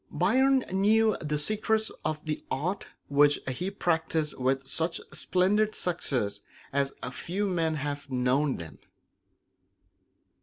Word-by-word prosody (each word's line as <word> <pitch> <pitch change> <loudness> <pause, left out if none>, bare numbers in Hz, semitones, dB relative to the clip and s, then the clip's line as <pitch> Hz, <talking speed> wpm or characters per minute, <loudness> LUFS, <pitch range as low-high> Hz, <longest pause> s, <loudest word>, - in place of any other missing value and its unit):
Byron 260 +8 +3
knew 215 +3 +4
the 150 -1 -1
secrets 215 +6 0
of 155 0 -2
the 155 -1 -3
art 180 +9 -2 0.2
which 145 +1 +4
he 135 +9 -2
practiced 160 -5 0
with 135 +1 +1
such 165 +4 -1
splendid 210 +4 +2
success 130 - -1 0.3
as 140 0 +1 0.2
few 195 +4 -2
men 165 -4 0
have 145 -1 -4
known 130 +3 +1
them. 85 -2 -9
160 Hz, 115 wpm, -28 LUFS, 140-195 Hz, 0.3 s, knew